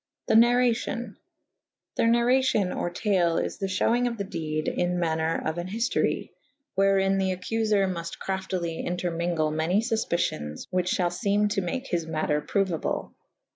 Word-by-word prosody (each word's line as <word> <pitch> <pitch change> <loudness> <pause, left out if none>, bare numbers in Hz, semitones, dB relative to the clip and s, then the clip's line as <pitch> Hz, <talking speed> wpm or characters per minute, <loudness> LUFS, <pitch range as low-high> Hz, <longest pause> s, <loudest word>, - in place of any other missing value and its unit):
The - - +1
narracion. 240 -1 +3 0.8
The - - +2
narracio« 235 -4 +3
or - - -1
tale 175 -2 +1
is - - -2
the 195 - -1
fhewynge 235 +6 +2
of 235 -1 -3
the 200 - -2
dede 155 -5 -3
in 180 0 0
maner 160 -1 0
of 160 +2 -1
an 175 - -4
hiftorye 230 +7 -1 0.2
/ 280 0 -53
wherin 195 0 +3
the 190 -1 0
accufer 215 +1 +1
mufte 170 -2 -4
craftly 185 -3 -3
entermewgle 170 -3 -1
many 160 +5 +1
fufpicyons 170 - -1
which 180 -1 +1
fhall 175 -1 0
feme 205 +1 +1
to 200 - 0
make 255 +9 -3
his 170 -8 -2
mater 155 -2 0
prouable. 190 -4 -1
190 Hz, 150 wpm, -26 LUFS, 170-220 Hz, 0.8 s, narracion